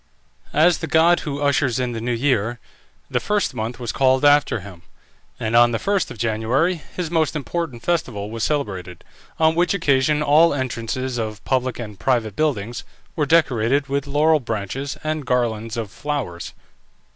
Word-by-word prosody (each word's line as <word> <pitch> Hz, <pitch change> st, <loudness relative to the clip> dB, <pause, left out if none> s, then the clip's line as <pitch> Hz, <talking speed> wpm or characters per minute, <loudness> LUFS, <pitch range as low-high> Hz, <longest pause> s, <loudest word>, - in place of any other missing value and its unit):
As 160 Hz, +2 st, +4 dB
the 160 Hz, -, -4 dB
god 165 Hz, +2 st, +4 dB
who 145 Hz, -2 st, -4 dB
ushers 140 Hz, -3 st, +1 dB
in 125 Hz, -1 st, -1 dB
the 115 Hz, -1 st, -5 dB
new 120 Hz, +2 st, -2 dB
year, 120 Hz, -2 st, 0 dB, 0.5 s
the -, -, +1 dB
first 210 Hz, -7 st, 0 dB
month 115 Hz, +1 st, -4 dB
was 120 Hz, -2 st, -3 dB
called 130 Hz, +1 st, +2 dB
after 145 Hz, -6 st, +4 dB
him, 90 Hz, -3 st, -11 dB, 0.6 s
and 110 Hz, +1 st, -1 dB
on 120 Hz, 0 st, +6 dB
the -, -, +1 dB
1st 200 Hz, -, 0 dB
of -, -, -9 dB
January 120 Hz, -, 0 dB
his 175 Hz, -3 st, -3 dB
most 160 Hz, -2 st, +1 dB
important 150 Hz, -4 st, -4 dB
festival 115 Hz, -12 st, -2 dB
was 115 Hz, -1 st, -4 dB
celebrated, 95 Hz, -, -3 dB, 0.3 s
on 160 Hz, 0 st, +4 dB
which 175 Hz, +4 st, +1 dB
occasion 150 Hz, -3 st, +2 dB
all 150 Hz, +2 st, +5 dB
entrances 130 Hz, -1 st, -3 dB
of 110 Hz, -1 st, -5 dB
public 130 Hz, -2 st, 0 dB
and 105 Hz, -4 st, -8 dB
private 115 Hz, -6 st, 0 dB
buildings 120 Hz, -6 st, -1 dB, 0.3 s
were 150 Hz, -3 st, 0 dB
decorated 140 Hz, -3 st, +2 dB
with 140 Hz, 0 st, -1 dB
laurel 155 Hz, +2 st, +3 dB
branches 115 Hz, +3 st, -4 dB
and 155 Hz, -3 st, -3 dB
garlands 115 Hz, -3 st, -1 dB
of 110 Hz, -3 st, -4 dB
flowers. 130 Hz, -10 st, -4 dB
130 Hz, 165 wpm, -21 LUFS, 115-150 Hz, 0.6 s, on